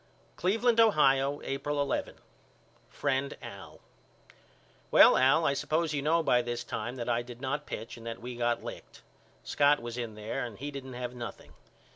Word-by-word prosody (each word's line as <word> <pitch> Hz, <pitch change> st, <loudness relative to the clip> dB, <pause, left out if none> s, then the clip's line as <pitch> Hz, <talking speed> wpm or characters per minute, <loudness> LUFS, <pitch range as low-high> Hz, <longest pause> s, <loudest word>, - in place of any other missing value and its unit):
Cleveland, 225 Hz, +5 st, +2 dB
Ohio, 140 Hz, -10 st, +4 dB
April 145 Hz, +2 st, -2 dB
11. 140 Hz, -, -1 dB, 0.7 s
FRIEND 140 Hz, -1 st, -1 dB
AL: -, -, -10 dB, 1.1 s
Well -, -, +8 dB
Al 135 Hz, +6 st, +4 dB
I 140 Hz, -, +3 dB
suppose 155 Hz, +3 st, 0 dB
you 145 Hz, -, -1 dB
know 165 Hz, +3 st, +2 dB
by 125 Hz, -4 st, +3 dB
this 120 Hz, 0 st, -4 dB
time 120 Hz, +3 st, -4 dB
that 120 Hz, -2 st, -5 dB
I 120 Hz, 0 st, +1 dB
did 120 Hz, 0 st, -10 dB
not 145 Hz, +3 st, -3 dB
pitch 115 Hz, -, -6 dB
and 115 Hz, 0 st, -10 dB
that 115 Hz, 0 st, -4 dB
we 125 Hz, +1 st, -7 dB
got 120 Hz, 0 st, 0 dB
licked. -, -, -10 dB, 0.4 s
Scott 145 Hz, +1 st, +3 dB
was 120 Hz, +1 st, -6 dB
in 115 Hz, -3 st, -5 dB
there 105 Hz, +1 st, -4 dB
and 115 Hz, -4 st, -7 dB
he 145 Hz, +3 st, -5 dB
didn't 135 Hz, -2 st, -8 dB
have 125 Hz, 0 st, -5 dB
nothing. 120 Hz, -2 st, -8 dB
130 Hz, 170 wpm, -30 LUFS, 120-145 Hz, 1.1 s, Well